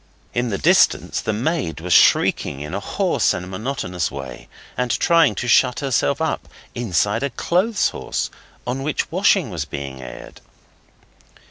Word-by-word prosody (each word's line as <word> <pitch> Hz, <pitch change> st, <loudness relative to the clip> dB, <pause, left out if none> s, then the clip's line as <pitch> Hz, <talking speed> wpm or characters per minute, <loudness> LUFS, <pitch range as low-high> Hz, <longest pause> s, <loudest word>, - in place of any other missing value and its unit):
In 120 Hz, 0 st, 0 dB
the 100 Hz, -, -1 dB
distance -, -, +3 dB
the -, -, -1 dB
maid 125 Hz, -, -2 dB
was 90 Hz, +1 st, -1 dB
shrieking 70 Hz, -, +4 dB
in 75 Hz, +1 st, -6 dB
a -, -, -1 dB
hoarse -, -, 0 dB
and 90 Hz, -, -6 dB
monotonous 95 Hz, -4 st, -3 dB
way, 65 Hz, -3 st, -8 dB, 0.3 s
and 125 Hz, -1 st, -1 dB
trying 165 Hz, -5 st, +3 dB
to 125 Hz, -, -3 dB
shut 120 Hz, +2 st, +4 dB
herself 135 Hz, -4 st, +1 dB
up -, -, -2 dB, 0.3 s
inside 105 Hz, -1 st, 0 dB
a 140 Hz, -, -1 dB
clothes 185 Hz, -, +1 dB
horse -, -, -4 dB, 0.3 s
on 125 Hz, +2 st, -3 dB
which 150 Hz, +2 st, -2 dB
washing 185 Hz, -, +2 dB
was 85 Hz, -5 st, -3 dB
being 70 Hz, -2 st, -7 dB
aired. 65 Hz, 0 st, -10 dB
115 Hz, 150 wpm, -21 LUFS, 85-140 Hz, 0.3 s, shrieking